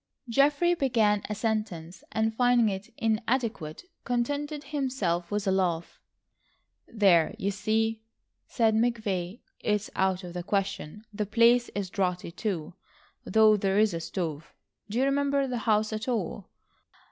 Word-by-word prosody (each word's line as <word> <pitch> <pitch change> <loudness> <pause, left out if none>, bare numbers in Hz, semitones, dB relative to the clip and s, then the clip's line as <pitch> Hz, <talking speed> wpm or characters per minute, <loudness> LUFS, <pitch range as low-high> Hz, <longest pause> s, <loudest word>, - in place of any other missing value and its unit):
Geoffrey 285 +8 +3
began 225 -9 +2
a 210 - -2
sentence 205 -6 -3
and 220 0 0
finding 245 -1 +3
it 195 +1 -6
inadequate, 225 -7 -1 0.2
contented 285 +5 -2
himself 255 - -2
with 205 0 -2
a 190 - +2
laugh. 175 -3 -1 0.9
"There 190 -7 +3
you 200 - -1
see," 220 +2 0 0.5
said 225 -3 +2
McVay. 215 -4 -1 0.2
"It's 210 -1 -1
out 190 0 +1
of 175 -1 -8
the 180 - -4
question. 195 0 -3
The 210 0 -2
place 235 +3 +4
is 195 -3 -3
draughty, 180 -3 -1
too, 175 -5 -3 0.5
though 215 +1 +5
there 195 -1 0
is 215 -2 +4
a 165 - -2
stove. 165 -2 -5 0.3
Do 215 - -3
you 260 - +3
remember 280 0 +1
the 250 -2 -3
house 215 0 +2
at 215 +2 -4
all? 210 -5 -3
215 Hz, 140 wpm, -28 LUFS, 190-240 Hz, 0.9 s, though